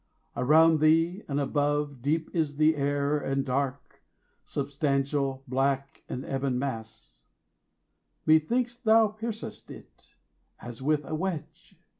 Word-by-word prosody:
Around 160 +4 +5
thee 165 +5 +3
and 140 0 -1
above 145 -1 0
Deep 155 +4 -1
is 155 -4 0
the 155 +2 +4
air 145 +1 0
and 135 -1 -1
dark, 135 +1 -3 0.5
substantial, 140 -1 -1
black, 135 +1 -1
An 130 - -5
ebon 135 -1 -1
mass: 115 - -6 1.1
methinks 235 +11 +3
thou 225 -2 +4
piercest 220 +1 -6
it, - - -14 0.4
As 120 0 -9
with 150 +1 +1
a - - -6
wedge! 165 -1 -5
145 Hz, 115 wpm, -28 LUFS, 135-160 Hz, 1.1 s, Around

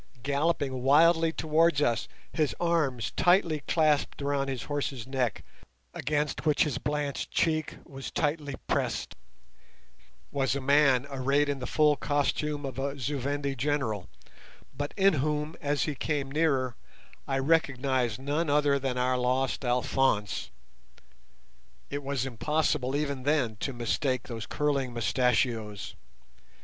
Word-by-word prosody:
Galloping 140 -2 0
wildly 165 +5 +5
towards 160 -1 +2
us, 120 -6 +1 0.3
his 155 -3 0
arms 155 -9 0
tightly 175 -4 +3
clasped 155 -3 +2
around 140 -1 0
his 130 -3 -3
horse's 140 -4 -3
neck, 130 -4 -1 0.5
against 150 +1 -1
which 150 -2 +3
his 140 -5 -2
blanched 145 -1 -2
cheek 155 -2 0
was 135 -1 -7
tightly 145 -2 -1
pressed, - - -1 1.2
was 135 -1 0
a - - -1
man 140 -1 +4
arrayed 140 +2 +1
in 140 -1 -1
the 125 - -4
full 150 +1 +3
costume 145 +1 -1
of 135 -1 -5
a 140 +1 -2
Zu 140 +2 -2
Vendi 140 +1 -2
general, 125 -7 -1 0.7
but 145 +1 -3
in 195 -1 +5
whom, 150 +2 -1
as 145 0 0
he 150 - -1
came 140 0 -2
nearer, 135 -5 +1 0.5
I 135 - 0
recognized 135 -5 +1
none 145 +4 -1
other 145 -1 +3
than 130 -2 -2
our 125 0 +1
lost 130 +2 0
Alphonse. 125 -3 +1 1.4
It 145 +1 -3
was 135 -2 -2
impossible 135 +1 0
even 140 -2 -1
then 135 -5 +1
to 135 - -3
mistake 125 +1 -1
those 115 -3 -6
curling 140 -4 -1
mustachios. 115 -3 0
140 Hz, 130 wpm, -28 LUFS, 130-150 Hz, 1.4 s, wildly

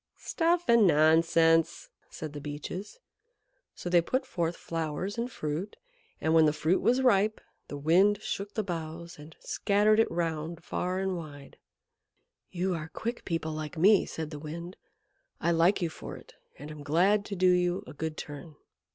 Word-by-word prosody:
"Stuff 345 +1 0
and 235 -4 +6
nonsense!" 165 +1 +3 0.2
said 155 -2 -7
the 145 - -7
Beeches. 150 - -6 0.8
So - - -7
they 175 -1 +4
put 260 +10 -1
forth 170 -8 -2
flowers 165 +4 -4
and 240 +2 -3
fruit, 155 +3 -4 0.4
and 160 - +1
when 160 -1 +6
the 150 - +3
fruit 155 +4 +1
was 250 +2 +2
ripe 215 -3 +3 0.3
the 145 - -6
Wind 185 +8 +3
shook 205 -1 -5
the 215 - 0
boughs 170 -2 -6
and 150 +2 -12
scattered 210 +2 +2
it 225 - +3
round 165 0 -3
far 180 +1 -2
and 190 -1 -1
wide. 145 -4 -10 0.9
"You 185 +1 -1
are 160 -2 -4
quick 235 +7 -5
people 165 -2 -2
like 155 +1 -6
me," 195 +4 +5
said 160 -1 -5
the 150 - -7
Wind. 170 +4 -7 0.6
"I 170 - +1
like 170 +3 +3
you 170 - 0
for - - -8
it, - - -16 0.2
and 150 +2 -9
am 150 -1 -9
glad 180 +8 +2
to 200 - -5
do 185 0 +4
you 180 +2 +1
a - - -10
good 160 +1 -4
turn." 145 +1 -8
170 Hz, 170 wpm, -29 LUFS, 155-200 Hz, 0.9 s, and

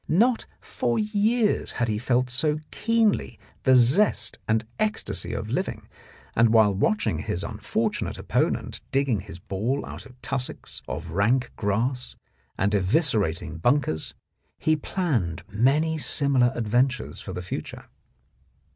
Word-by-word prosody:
Not 230 +8 +3
for 120 - -2
years 215 +1 +1
had 120 - 0
he 105 -1 -1
felt 125 +1 +1
so 150 +4 +1
keenly 230 -2 +1 0.3
the 130 -1 +6
zest 130 - +3
and 110 +1 +1
ecstasy 215 0 0
of - - -4
living, - - -2 0.5
and 115 +1 +5
while 110 -2 +5
watching 105 +2 +1
his - - -3
unfortunate - - -2
opponent - - -1
digging 135 -5 +2
his 85 - -9
ball 110 +10 -2
out - - -9
of 125 -1 -19
tussocks 130 -2 -4
of - - -5
rank 115 +8 +2
grass 120 +5 -1 0.4
and 100 +2 +1
eviscerating 95 - +1
bunkers, 120 - +1 0.4
he 155 - +2
planned 140 - -1
many 150 +9 +2
similar 140 -5 +2
adventures 125 +3 0
for - - -7
the 90 - -5
future. 90 - -6
125 Hz, 130 wpm, -25 LUFS, 105-150 Hz, 0.5 s, the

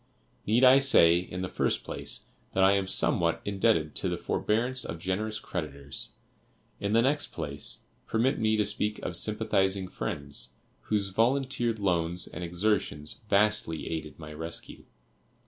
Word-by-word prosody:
Need 115 +5 +3
I 130 +1 +8
say, 85 -11 +6
in 90 +1 -6
the - - -2
first - - 0
place, - - -2 0.3
that 95 - +3
I 95 - +6
am 100 -1 +1
somewhat 85 -3 +2
indebted 100 -6 +1
to - - -1
the - - -2
forbearance 120 +4 0
of 85 - -5
generous 100 +5 -2
creditors. 70 -5 -5 0.7
In 100 +1 -2
the 115 +1 +4
next 145 +3 +1
place, - - -2 0.3
permit 125 +5 +1
me 110 0 +2
to 105 - +2
speak 105 +1 -2
of - - -2
sympathizing 95 0 0
friends, 70 -7 -2 0.3
whose 105 -2 0
volunteered 120 +1 +1
loans 90 -3 +2
and 90 - -7
exertions 85 -4 -1
vastly 105 -6 +2
aided 80 -2 -5
my 75 -1 -9
rescue. 80 +2 -6
95 Hz, 145 wpm, -28 LUFS, 85-110 Hz, 0.7 s, I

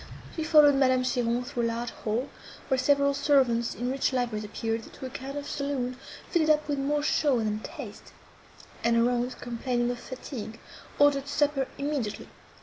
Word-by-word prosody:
She 320 - -2
followed 300 -2 +7
Madame 260 -2 +3
Cheron 245 -1 0
through 250 -1 -3
a 230 - +2
large 230 +1 -3
hall, 230 +5 -2 0.4
where 265 - +3
several 280 +1 +3
servants 265 -5 +2
in 245 +2 -2
rich 270 +1 +1
liveries 240 -4 -1
appeared, 225 +2 -3
to - - -8
a 255 - -6
kind 270 +3 -6
of 285 - -5
saloon, 270 -3 -2 0.3
fitted 320 -3 +2
up 305 0 +3
with 285 -2 -1
more 290 +2 0
show 290 -3 +2
than 215 -2 -1
taste; 235 -5 -9 0.7
and 235 0 +3
her 230 +1 +4
aunt, 245 +1 -2
complaining 240 0 -1
of 245 - -5
fatigue, 245 -4 -7 0.4
ordered 285 -1 +4
supper 290 -2 +1
immediately. 280 -7 -3
255 Hz, 170 wpm, -28 LUFS, 235-285 Hz, 0.7 s, followed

